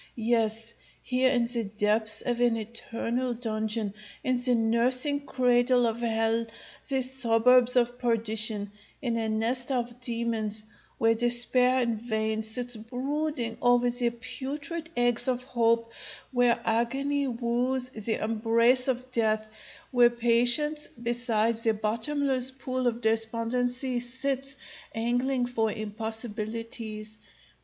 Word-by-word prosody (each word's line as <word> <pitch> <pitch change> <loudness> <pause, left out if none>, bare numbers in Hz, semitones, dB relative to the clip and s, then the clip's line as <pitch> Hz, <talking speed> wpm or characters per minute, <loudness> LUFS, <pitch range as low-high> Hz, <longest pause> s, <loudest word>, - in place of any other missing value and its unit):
Yes, 225 -1 0 0.3
here 255 0 +2
in 245 -2 +2
the 235 0 0
depths 210 +1 0
of 240 -1 -1
an 240 -1 +3
eternal 235 +2 -3
dungeon, 220 -2 -2 0.3
in 255 -3 +1
the 250 -1 +3
nursing 250 +5 +1
cradle 245 -1 +3
of 225 0 -1
hell, 225 0 0 0.4
the 265 -1 +2
suburbs 250 -1 +4
of 245 0 +1
perdition, 220 -3 -1 0.3
in 240 -3 0
a 225 -1 -1
nest 235 +4 -1
of 240 -1 -2
demons, 230 -3 -1 0.3
where 225 0 +3
despair 245 +2 +3
in 235 -2 -1
vain 220 -1 -2
sits 245 +2 -2
brooding 255 +2 -3
over 245 0 +3
the 240 0 +1
putrid 280 +8 -6
eggs 245 +1 +2
of 250 -1 -1
hope; 230 -2 +1 0.4
where 245 -2 +3
agony 270 +5 0
wooes 250 +1 0
the 220 -2 -3
embrace 230 +3 +2
of 255 0 -2
death; 220 -2 0 0.4
where 245 -2 +6
patience, 240 +6 +3
beside 235 -1 0
the 225 -1 +1
bottomless 255 +5 0
pool 255 -1 -3
of 235 0 -1
despondency, 240 +3 0
sits 265 +2 -2 0.4
angling 245 +3 0
for 225 -3 0
impossibilities. 220 0 -4
235 Hz, 120 wpm, -28 LUFS, 225-250 Hz, 0.4 s, where